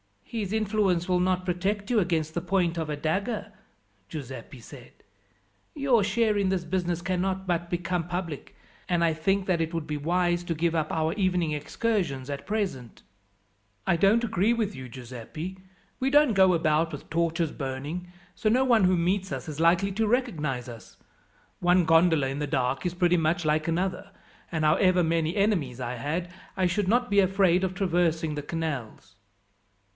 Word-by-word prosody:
"His 210 Hz, -5 st, -4 dB
influence 205 Hz, -5 st, +1 dB
will 180 Hz, -1 st, +3 dB
not 185 Hz, 0 st, +1 dB
protect 200 Hz, +4 st, -1 dB
you 235 Hz, -, +4 dB
against 165 Hz, -4 st, 0 dB
the 170 Hz, -, -2 dB
point 175 Hz, -1 st, 0 dB
of 160 Hz, -2 st, -2 dB
a 150 Hz, -, -1 dB
dagger," 200 Hz, +9 st, -2 dB, 0.6 s
Giuseppi 130 Hz, -3 st, -8 dB
said. -, -, -13 dB, 0.8 s
"Your 265 Hz, -7 st, +3 dB
share 215 Hz, +1 st, +1 dB
in 200 Hz, -1 st, +1 dB
this 185 Hz, -2 st, 0 dB
business 175 Hz, 0 st, -1 dB
cannot 190 Hz, +1 st, -1 dB
but 175 Hz, -1 st, -1 dB
become 175 Hz, -1 st, -2 dB
public, 175 Hz, -4 st, -5 dB, 0.3 s
and 175 Hz, -1 st, +2 dB
I 165 Hz, -1 st, +3 dB
think 190 Hz, +5 st, 0 dB
that 180 Hz, -3 st, +1 dB
it 165 Hz, +1 st, -2 dB
would 165 Hz, -2 st, -2 dB
be 150 Hz, -1 st, -3 dB
wise 175 Hz, +3 st, +1 dB
to 165 Hz, -, -2 dB
give 165 Hz, +1 st, 0 dB
up 155 Hz, -2 st, -1 dB
our 160 Hz, 0 st, 0 dB
evening 180 Hz, -5 st, +1 dB
excursions 150 Hz, -, -2 dB
at 140 Hz, 0 st, -6 dB
present." 195 Hz, -, -3 dB, 0.8 s
"I 170 Hz, -, +2 dB
don't 200 Hz, +7 st, +4 dB
agree 220 Hz, 0 st, +2 dB
with 220 Hz, -3 st, -1 dB
you, 130 Hz, -5 st, -8 dB
Giuseppi. 130 Hz, +9 st, -8 dB, 0.4 s
We 265 Hz, -, +1 dB
don't 290 Hz, -3 st, +5 dB
go 190 Hz, -2 st, +5 dB
about 165 Hz, 0 st, +1 dB
with -, -, -8 dB
torches 165 Hz, -1 st, 0 dB
burning, 145 Hz, +6 st, -5 dB, 0.3 s
so -, -, -3 dB
no 250 Hz, +4 st, +3 dB
one 235 Hz, -6 st, +4 dB
who 180 Hz, 0 st, +3 dB
meets 185 Hz, +2 st, 0 dB
us 135 Hz, +3 st, -5 dB
is 150 Hz, 0 st, -6 dB
likely 175 Hz, +4 st, +3 dB
to 220 Hz, +3 st, 0 dB
recognize 155 Hz, -, -1 dB
us. 115 Hz, -2 st, -12 dB, 0.6 s
One 180 Hz, 0 st, +4 dB
gondola 165 Hz, -3 st, +4 dB
in 135 Hz, +2 st, -4 dB
the 150 Hz, -, -2 dB
dark 130 Hz, +1 st, -1 dB
is 175 Hz, 0 st, -1 dB
pretty 180 Hz, -1 st, +3 dB
much 165 Hz, +1 st, 0 dB
like 155 Hz, +1 st, +1 dB
another, 185 Hz, +4 st, -2 dB, 0.4 s
and 160 Hz, -3 st, -1 dB
however 180 Hz, +4 st, +4 dB
many 165 Hz, 0 st, 0 dB
enemies 180 Hz, -, 0 dB
I 125 Hz, 0 st, -3 dB
had, 165 Hz, +8 st, -3 dB, 0.3 s
I 185 Hz, -, +2 dB
should 185 Hz, +2 st, 0 dB
not 245 Hz, +2 st, +2 dB
be 200 Hz, -, +5 dB
afraid 190 Hz, -1 st, +3 dB
of 185 Hz, 0 st, -1 dB
traversing 170 Hz, -4 st, +1 dB
the 150 Hz, -, -3 dB
canals." 140 Hz, -, -5 dB
175 Hz, 175 wpm, -27 LUFS, 155-195 Hz, 0.8 s, don't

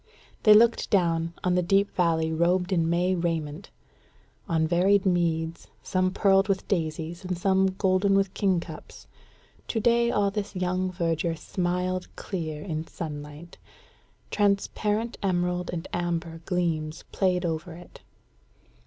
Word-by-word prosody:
They 215 Hz, -2 st, +7 dB
looked 230 Hz, +2 st, +4 dB
down 170 Hz, -4 st, +1 dB
on 180 Hz, -, +2 dB
the 180 Hz, -, +3 dB
deep 195 Hz, +3 st, +1 dB
valley 165 Hz, -3 st, +1 dB
robed 180 Hz, +3 st, +1 dB
in 165 Hz, -2 st, +1 dB
May 175 Hz, +2 st, +2 dB
raiment; 165 Hz, -1 st, -3 dB, 0.8 s
on 160 Hz, -1 st, +2 dB
varied 185 Hz, +4 st, +3 dB
meads, 165 Hz, -2 st, 0 dB, 0.2 s
some 185 Hz, 0 st, +1 dB
pearled 195 Hz, 0 st, +3 dB
with 195 Hz, -2 st, -1 dB
daisies 165 Hz, -1 st, -2 dB
and 180 Hz, -1 st, -3 dB
some 190 Hz, +1 st, +2 dB
golden 195 Hz, 0 st, +2 dB
with 195 Hz, -1 st, +1 dB
kingcups: 190 Hz, -4 st, -3 dB, 0.6 s
to 225 Hz, -, -1 dB
day 235 Hz, +1 st, +3 dB
all 200 Hz, -3 st, +1 dB
this 205 Hz, -1 st, -4 dB
young 185 Hz, 0 st, -1 dB
verdure 165 Hz, -2 st, -1 dB
smiled 180 Hz, +2 st, -2 dB
clear 155 Hz, -6 st, -5 dB
in 160 Hz, -3 st, -4 dB
sunlight; 150 Hz, +1 st, -8 dB, 0.7 s
transparent 210 Hz, +2 st, 0 dB
emerald 180 Hz, -2 st, 0 dB
and 170 Hz, -2 st, -5 dB
amber 170 Hz, -1 st, -3 dB
gleams 160 Hz, -4 st, -1 dB
played 180 Hz, -2 st, +1 dB
over 165 Hz, +1 st, -3 dB
it. 175 Hz, +1 st, -13 dB
180 Hz, 130 wpm, -26 LUFS, 165-195 Hz, 0.8 s, They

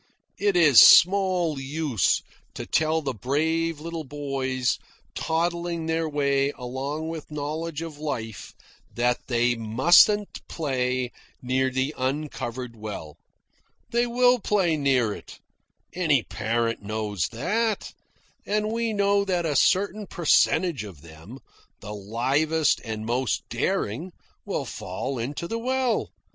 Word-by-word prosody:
It 200 Hz, -2 st, +2 dB
is 150 Hz, -8 st, +8 dB
small 180 Hz, -4 st, +6 dB
use 135 Hz, -, 0 dB, 0.3 s
to -, -, -5 dB
tell 160 Hz, 0 st, +1 dB
the 135 Hz, -2 st, -2 dB
brave 160 Hz, +7 st, -1 dB
little 165 Hz, +1 st, -5 dB
boys 135 Hz, -3 st, -2 dB, 0.3 s
toddling 170 Hz, 0 st, -1 dB
their 160 Hz, 0 st, -1 dB
way 140 Hz, -1 st, +1 dB
along 140 Hz, +6 st, -4 dB
into 155 Hz, -2 st, -9 dB
knowledge 155 Hz, +2 st, -4 dB
of 155 Hz, -3 st, -8 dB
life 115 Hz, -8 st, -5 dB, 0.4 s
that 120 Hz, +1 st, +1 dB
they 120 Hz, -1 st, +2 dB
mustn't 155 Hz, -, +4 dB
play 130 Hz, -4 st, -1 dB, 0.3 s
near 130 Hz, +1 st, +1 dB
the 130 Hz, +3 st, -1 dB
uncovered 130 Hz, -3 st, -4 dB
well. 105 Hz, -9 st, -7 dB, 0.7 s
They'll 245 Hz, +1 st, +3 dB
play 190 Hz, -6 st, +1 dB
near 130 Hz, -7 st, +2 dB
it. -, -, -11 dB, 0.6 s
Any 155 Hz, -8 st, +2 dB
parent 115 Hz, +2 st, -2 dB
knows 105 Hz, -4 st, -2 dB
that. 210 Hz, -, -1 dB, 0.5 s
And 210 Hz, +1 st, -1 dB
we 230 Hz, -1 st, -1 dB
know 200 Hz, 0 st, +2 dB
that 180 Hz, -3 st, -1 dB
a 150 Hz, -3 st, -1 dB
certain 200 Hz, +7 st, +2 dB
percentage 170 Hz, -, +2 dB
of 90 Hz, -8 st, -11 dB
them, 85 Hz, +9 st, -12 dB, 0.4 s
the 105 Hz, -, -8 dB
livest 135 Hz, +10 st, +1 dB
and 110 Hz, -1 st, -5 dB
most 120 Hz, +1 st, -1 dB
daring, 160 Hz, -, -2 dB, 0.3 s
will -, -, -2 dB
fall 125 Hz, +8 st, -5 dB
into 140 Hz, +8 st, -4 dB
the 230 Hz, +4 st, -3 dB
well. 255 Hz, -1 st, 0 dB
145 Hz, 120 wpm, -25 LUFS, 125-170 Hz, 0.7 s, is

